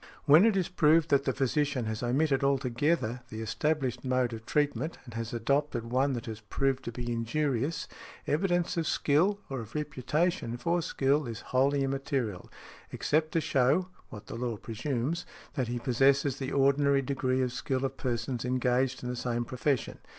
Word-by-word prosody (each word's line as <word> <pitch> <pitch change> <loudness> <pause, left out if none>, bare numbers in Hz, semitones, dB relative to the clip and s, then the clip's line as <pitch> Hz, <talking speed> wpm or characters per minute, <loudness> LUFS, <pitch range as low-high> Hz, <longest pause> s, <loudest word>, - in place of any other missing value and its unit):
When 155 +9 +7
it 215 -3 +2
is 185 - +1
proved 165 -3 +3
that 140 -1 +4
the 130 - +2
physician 135 -1 0
has 110 0 -3
omitted 135 +3 +1
altogether 130 -1 +1
the 110 - -6
established 130 +3 -1
mode 125 -2 +1
of 115 0 -8
treatment, 145 +1 0
and 120 - -11
has 115 0 -4
adopted 120 0 -1
one 135 +2 +2
that 120 -2 -4
has 110 -2 -6
proved 135 +4 -1
to 120 - -3
be 120 0 -4
injurious, 140 +5 -1 0.4
evidence 175 +2 +1
of 165 -2 0
skill, 185 +8 +2
or 135 -1 -4
of 110 +2 -9
reputation 150 -1 -1
for 170 +6 0
skill, 140 -2 +1
is 115 -1 -6
wholly 135 +2 +2
immaterial, 135 - -2 0.4
except 155 +1 0
to 165 - +2
show 140 +8 +2 0.2
(what 105 -1 -10
the - - -8
law 115 -1 -3
presumes) 130 +9 -2 0.3
that 130 -5 -1
he 120 +1 -2
possesses 135 +2 +2
the 135 0 -4
ordinary 140 0 +3
|72| - - -9
degree 130 -1 0
of 125 -1 -2
skill 130 0 -1
of 135 0 -3
persons 120 0 -2
engaged 125 +1 0
in 125 - -3
the 125 - -2
same 120 -1 -2
profession. 130 +1 -1
135 Hz, 175 wpm, -29 LUFS, 120-150 Hz, 0.4 s, When